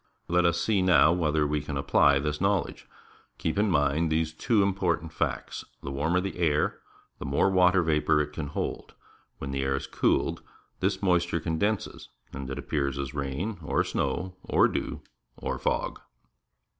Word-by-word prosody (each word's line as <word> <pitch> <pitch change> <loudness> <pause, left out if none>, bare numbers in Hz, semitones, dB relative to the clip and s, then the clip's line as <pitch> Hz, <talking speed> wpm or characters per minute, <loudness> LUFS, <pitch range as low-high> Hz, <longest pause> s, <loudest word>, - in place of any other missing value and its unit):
Let 90 +1 +2
us 85 0 +2
see 105 -4 +1
now 90 -3 +5
whether 80 -3 +1
we 75 0 0
can 70 -1 -4
apply 70 0 +4
this 75 +2 -2
knowledge. 95 -4 0 0.5
• - - -44
Keep 80 +5 -1
in 105 0 +3
mind 75 0 +2
these 80 0 0
two 105 +5 +2
important 90 -5 -1
facts. - - -3 0.2
The 70 - -4
warmer 80 +6 +1
the 95 -1 -4
air, 75 -3 +1 0.4
the - - -6
more 70 +8 +2
water 90 -1 +4
vapour 75 -1 +2
it 75 0 -2
can 75 -1 -4
hold. 70 - -4 0.4
When 70 - -5
the 70 0 -1
air 65 0 0
is 70 - -4
cooled, - - 0 0.4
this - - -1
moisture 85 -2 +2
condenses 95 +6 -2 0.2
and 65 0 -6
appears 70 0 -2
as 70 0 -4
rain, 75 +9 -3
or - - +1
snow, 90 +1 -2
or - - +4
dew, - - -4 0.4
or - - -3
fog. - - -1
80 Hz, 170 wpm, -27 LUFS, 70-90 Hz, 0.5 s, now